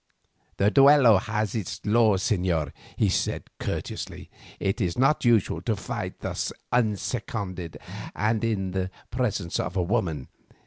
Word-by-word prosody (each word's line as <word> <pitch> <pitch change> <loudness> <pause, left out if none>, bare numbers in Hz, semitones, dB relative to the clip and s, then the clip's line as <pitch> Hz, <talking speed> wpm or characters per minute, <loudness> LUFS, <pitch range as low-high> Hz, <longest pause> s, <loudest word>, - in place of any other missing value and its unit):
"The 100 +1 +3
duello 135 -6 +7
has 110 -1 -2
its 105 -7 -3
laws, 105 -3 +4
señor," 90 - +1 0.3
he - - +3
said - - 0 0.2
courteously. - - -5 0.3
"It 95 +4 -1
is 85 -3 0
not 135 +4 +3
usual 110 -8 +3
to 110 +4 0
fight 100 - -5
thus - - -2 0.2
unseconded 105 -5 -1 0.4
and 110 +2 +1
in 100 -5 0
the 95 0 -1 0.2
presence 105 -8 -1
of 90 +4 -2
a 90 - +2
woman. 85 - -1
105 Hz, 135 wpm, -26 LUFS, 90-115 Hz, 0.4 s, duello